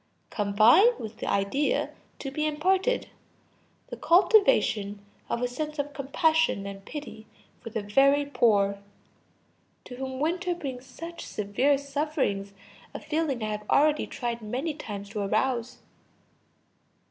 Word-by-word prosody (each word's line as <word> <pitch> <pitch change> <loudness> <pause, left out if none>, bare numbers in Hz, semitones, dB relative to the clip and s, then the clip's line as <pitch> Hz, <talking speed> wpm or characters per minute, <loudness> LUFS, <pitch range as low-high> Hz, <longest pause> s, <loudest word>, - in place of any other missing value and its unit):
] - - -43
Combine 225 - +5
with 220 0 -8
the - - -5
idea 200 +9 0 0.3
to 270 - -6
be 305 +3 -2
imparted, 375 +10 +1 0.8
the - - -5
cultivation 340 - +3 0.2
of 235 - -1
a - - +2
sense 300 +5 -5
of 285 0 -3
compassion 295 -4 +1
and 195 0 -8
pity 290 -7 -8 0.3
for 230 - -7
the 220 -1 -4
very 275 +7 +4
poor, 200 -7 +2 1.1
to 250 - -9
whom 260 0 -5
winter 350 +4 0
brings 265 -6 -7
such 335 +3 -8
severe 230 +8 +1
suffering; 280 -8 -2 0.4
a - - -3
feeling 300 -7 -2
I 215 - -2
have 210 0 -6
already 300 +1 +3
tried 240 -3 -4
many 255 +9 -3
times 205 -9 -7
to 210 +1 -5
arouse. 230 +4 -1
265 Hz, 135 wpm, -27 LUFS, 215-305 Hz, 1.1 s, Combine